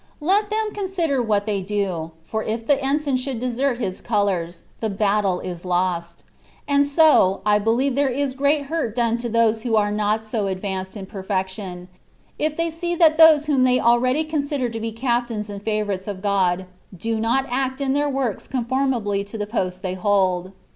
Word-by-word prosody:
Let 395 +7 +2
them 435 0 -1
consider 360 -9 -1
what 210 -3 +1
they 205 -3 -1
do, 190 -5 -2
for 220 +6 -3
if 225 +1 -3
the 280 +2 +2
en 275 +2 +2
sign 285 -4 0
should 255 -2 -4
desert 250 +1 0
his 190 -6 -4
colours, 185 -6 -1 0.2
the 220 - -1
battle 200 -2 +1
is 175 -2 -6
lost; 175 -2 -1 0.4
and 285 0 +3
so, 285 - +4
I 210 0 +4
beheve 235 +6 +1
there 280 +1 +2
is 270 +1 -1
great 285 +2 +1
hurt 280 -6 -3
done 235 -1 +1
to 240 0 -3
those 230 -1 +3
others - - -10
who 225 -1 0
are 205 -1 +2
not 210 +1 0
so 215 -2 -2
advanced 190 +1 -4
(in 195 - -6
perfection), 190 -2 -4 0.5
if 305 0 -1
they 335 0 0
see 345 +2 -3
that 325 -2 +4
those 315 -2 +7
whom 280 -4 +2
they 255 0 +4
already 255 +5 +3
consider 285 -4 -2
to 225 0 -5
be 225 0 -3
captains 235 -2 -2
and 200 -1 -7
favourites 205 -3 -2
of 200 -1 -5
God, 190 -2 +1 0.3
do 225 +5 -2
not 235 +4 +1
act 260 +1 -1
in 270 -1 0
their 290 +1 +1
works 265 -6 -2
conformably 240 -5 0
to 205 +3 -8
the 210 - -2
post 185 -3 -3
they 185 -1 -2
hold. 185 -1 +1
225 Hz, 190 wpm, -22 LUFS, 200-275 Hz, 0.5 s, those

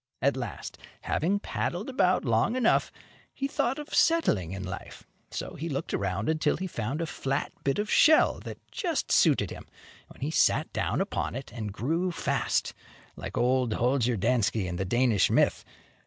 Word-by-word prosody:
At 140 +1 +2
last, 120 -7 -6 0.2
having 185 +6 0
paddled 185 -1 -3
about 185 - +2
long 115 - +2
enough, 245 -3 +2 0.4
he 275 - -1
thought 265 -2 0
of 295 0 -8
settling 210 - +3
in 95 0 -5
life. 95 +2 -7 0.3
So - - -5
he 165 +3 -5
looked 140 - -3
around 100 +1 -1
until 155 0 +1
he 190 - -4
found 135 -2 -3
a - - 0
flat 140 -2 -2
bit 135 - +1
of 210 +1 -1
shell 310 +8 +5
that - - -8
just 335 -6 -2
suited 135 - +4
him, - - -9 0.4
when - - -17
he 145 +3 -1
sat - - +2
down - - 0
upon - - -2
it, 135 -3 -7
and 110 -3 -4
grew 165 - -1
fast, - - -1 0.4
like - - -7
old 125 -1 +2
Holger 125 -1 +1
Danske, 110 -1 +1
in 90 -1 -4
the 95 - -1
Danish 120 0 +3
myth. - - +2
135 Hz, 170 wpm, -28 LUFS, 110-180 Hz, 0.4 s, shell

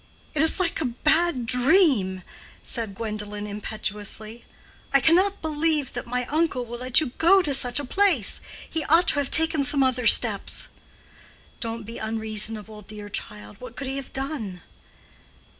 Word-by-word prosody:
"It 305 - 0
is 320 +4 +7
like 345 -3 -1
a - - -1 0.2
bad 315 -5 +2
dream," 250 - +2 0.4
said 225 -5 -2
Gwendolen, 210 -1 -6
impetuously. 210 +2 -6 0.5
"I 275 - +4
cannot 370 +8 +2
believe 305 -2 0
that 240 0 -6
my 250 +1 -2
uncle 300 -3 -1
will 240 +1 -8
let 255 +2 +2
you 305 -6 -3
go 375 +3 +5
to 290 - -1
such 250 -1 +1
a 285 - -5
place. 345 - +1 0.3
He 320 -2 -3
ought 330 +2 +4
to 290 - +2
have 280 - -2
taken 320 -2 +2
some 275 0 +2
other 255 -2 0
steps." - - +5 0.9
"Don't 230 0 -5
be 230 +2 -9
unreasonable, 220 -1 -2
dear 210 0 -10
child. 105 - -8
What 250 -2 -10
could 275 - -5
he 270 +1 -4
have 275 - -8
done?" 265 - -5
250 Hz, 160 wpm, -24 LUFS, 215-310 Hz, 0.9 s, is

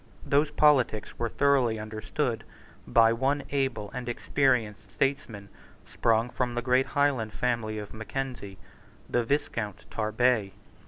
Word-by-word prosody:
Those 145 +2 +2
politics 135 -9 +2
were 115 - -1
thoroughly 130 -4 +2
understood 110 +3 -3 0.4
by 115 0 +5
one 135 +4 0
able 130 -7 -1
and 125 -1 -5
experienced 120 - 0
statesman, 115 -7 -2 0.4
sprung 115 +1 +1
from 120 +1 -2
the 120 - -2
great 130 +1 +2
Highland 130 -7 +1
family 115 -3 -1
of 105 -1 -7
Mackenzie, 110 -3 -5 0.5
the 120 - +1
Viscount 115 -6 -2
Tarbet. 110 -1 +1
120 Hz, 120 wpm, -28 LUFS, 110-135 Hz, 0.5 s, by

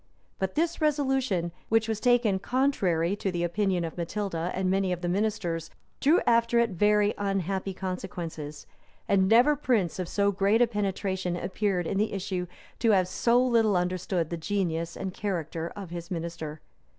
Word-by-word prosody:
But 190 -1 -2
this 335 +2 0
resolution, 265 - +1 0.2
which 225 0 +3
was 220 -2 -1
taken 240 -5 +3
contrary 195 -9 +1
to 195 - -2
the 175 -1 -2
opinion 185 0 0
of 165 - -7
Matilda, 175 -1 -2
and 190 0 0
many 190 0 +1
of 175 -1 -2
the 175 - -2
ministers, 175 -4 -1 0.3
drew 310 +6 +4
after 235 0 +3
it 235 -2 +3
very 210 +3 +3
unhappy 195 -1 -1
consequences; 175 -5 -5 0.4
and 190 -1 +3
never 245 +8 +5
prince 225 - 0
of 180 -2 -3
so 200 0 +2
great 200 +5 +3
penetration 190 -3 -1
appeared, 190 -1 -1
in 195 - -1
the 215 0 0
issue, 185 -2 -3 0.3
to 230 - +2
have 185 -2 +3
so 240 +6 +2
little 225 -5 +3
understood 180 -1 -1
the 170 - -2
genius 170 -2 -2
and 190 -1 -4
character 170 -5 -3
of 195 -4 -8
his 170 0 -6
minister. 165 -3 -5
195 Hz, 165 wpm, -28 LUFS, 175-215 Hz, 0.4 s, never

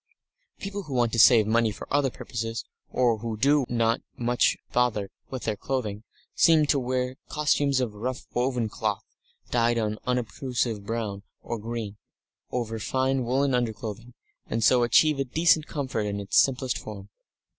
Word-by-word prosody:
People 200 0 -5
who 150 -8 -6
want 120 -2 +2
to 115 - -1
save 115 -1 +7
money 115 +1 +2
for 105 - -8
other 140 -1 +3
purposes, 115 -2 -5 0.2
or 120 -3 +2
who 115 0 -4
do 140 +3 +3
not 115 -1 +1
want - - -46 0.2
much 120 0 +2 0.2
bother 115 -5 +1 0.2
with 130 -2 -5
their 110 - -1
clothing, 105 -3 -3 0.3
seem 160 -2 +5
to 145 -1 +2
wear 130 0 -2
costumes 145 -2 +2
of 120 -5 -1
rough 120 +5 -4
woven 125 -2 0
cloth, - - -2 0.5
dyed 120 0 +2
an 110 -1 -1
unobtrusive 125 -2 -1
brown 110 -4 -3 0.2
or 115 -1 -4
green, 110 -2 -5 0.5
over 115 -2 -3
fine 130 +3 0
woollen 135 +3 +1
underclothing, 115 0 -3 0.3
and 115 0 -1
so 125 +3 +5
achieve 140 +5 +4
a - - +2
decent 155 +3 +2
comfort 130 -8 -2
in 100 0 -3
its 100 -1 -4
simplest 130 -1 +1
form. 100 -2 -9
120 Hz, 160 wpm, -26 LUFS, 110-130 Hz, 0.5 s, save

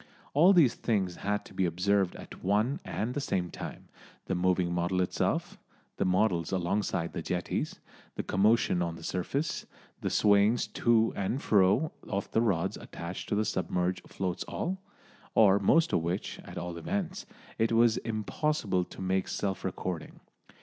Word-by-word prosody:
All 165 +7 +7
these 165 -10 +6
things 95 -6 -1
had 105 +1 -2
to - - -13
be 95 - 0
observed 95 +2 +1
at - - -11
one 105 +9 +1
and 115 +4 -3
the 145 - -2
same 90 -10 -1
time - - -7 0.4
the - - -2
moving 90 -1 +1
model 85 +1 0
itself, 90 - -1 0.4
the - - +1
models 90 -2 +2
alongside 90 -2 -1
the 85 - -3
jetties, 90 +2 -2 0.4
the - - -3
commotion 100 -2 +3
on 85 -1 -1
the - - -11
surface, 135 - -2 0.3
the - - -2
swayings 105 +3 +4
to 115 -1 +3
and 100 +7 -1
fro 105 +8 +3 0.2
of 100 -1 -3
the 115 - +3
rods 95 -5 +1
attached 85 +2 -7
to - - +1
the 105 +1 +1
submerged 90 -1 -1
floats 90 -2 -3
all, 185 +2 -3 0.5
or 100 -2 +6
most 165 - +3
of - - +3
which, 85 +4 -3
at - - -9
all 85 -1 -4
events, 190 - -3 0.3
it 115 +1 +2
was 115 0 +4
impossible 110 - -1
to - - -11
make 95 0 0
self 95 -1 -2
recording. 90 -2 -4
100 Hz, 160 wpm, -30 LUFS, 90-115 Hz, 0.5 s, All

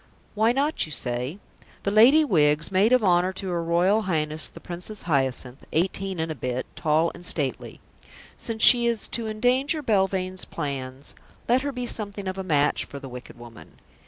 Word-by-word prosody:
Why 220 +2 +3
not? 280 - 0
you - - -11
say. 125 +4 -3 0.5
The 200 - 0
Lady 255 +9 +6
Wiggs, 155 - +2
maid 195 +5 +3
of 255 -3 +4
honour 180 -1 +3
to 190 0 -5
her 170 -1 -1
Royal 175 +6 +2
Highness 155 -5 -2
the - - -13
Princess 180 +4 -5
Hyacinth, 135 -4 -1
eighteen 190 +2 -1
and 160 0 -2
a - - -1
bit, 125 -2 -3
tall 160 +2 +1
and 175 - -12
stately. 145 -7 0 0.6
Since 225 -1 -3
she 240 -2 +7
is 235 -2 0
to 230 -2 -3
endanger 255 +8 +1
Belvane's 190 -4 0
plans, 135 -3 -5 0.3
let 245 +2 +3
her 285 +1 -2
be 250 -2 -4
something 205 -4 -3
of 190 +1 -4
a - - -3
match 150 -5 +1
for 140 - -10
the 135 -1 -8
wicked 125 -1 -10
woman. 120 -1 -14
185 Hz, 180 wpm, -25 LUFS, 150-220 Hz, 0.6 s, she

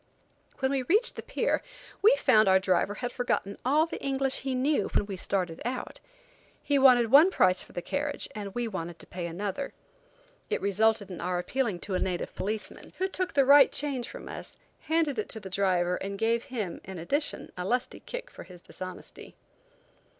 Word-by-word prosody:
When 265 0 0
we 275 -1 +1
reached 415 - +3
the - - -5
pier, - - 0 0.4
we 440 +5 +7
found 215 - +4
our 190 0 +6
driver 190 +2 +1
had 245 +1 -4
forgotten 225 -5 -2
all 295 +5 +3
the 330 - -7
English 270 -1 0
he 265 -1 -2
knew 280 +4 +1
when - - +3
we 200 -1 -5
started 180 -3 -2
out. 250 +1 -4 0.6
He 285 -1 +2
wanted 245 -4 +6
one 300 +7 +8
price 185 - +3
for - - -11
the 175 - -4
carriage 290 +8 -2
and 200 -2 -6
we 240 -1 -1
wanted 175 -5 -5
to - - -12
pay 175 -1 -5
another. 200 +10 -4 0.8
It - - 0
resulted 200 0 +1
in 180 - -6
our 180 +1 -1
appealing 210 0 -1
to 195 - -5
a 185 - +1
native 180 -2 -2
policeman, 215 +2 -5
who 380 - 0
took 370 -3 -3
the 275 -2 +5
right 280 0 +8
change 270 -5 -2
from - - -9
us, - - -7 0.2
handed 315 -5 0
it 215 - -3
to 220 - -4
the 190 -3 -9
driver, 180 -2 +1
and 200 +1 -5
gave 230 +2 +1
him, 210 -9 -4
in 190 0 -8
addition, 280 - -2
a 180 - -4
lusty 245 +6 -1
kick - - -7
for - - -11
his 180 0 -12
dishonesty. 185 +1 -9
220 Hz, 195 wpm, -28 LUFS, 185-275 Hz, 0.8 s, one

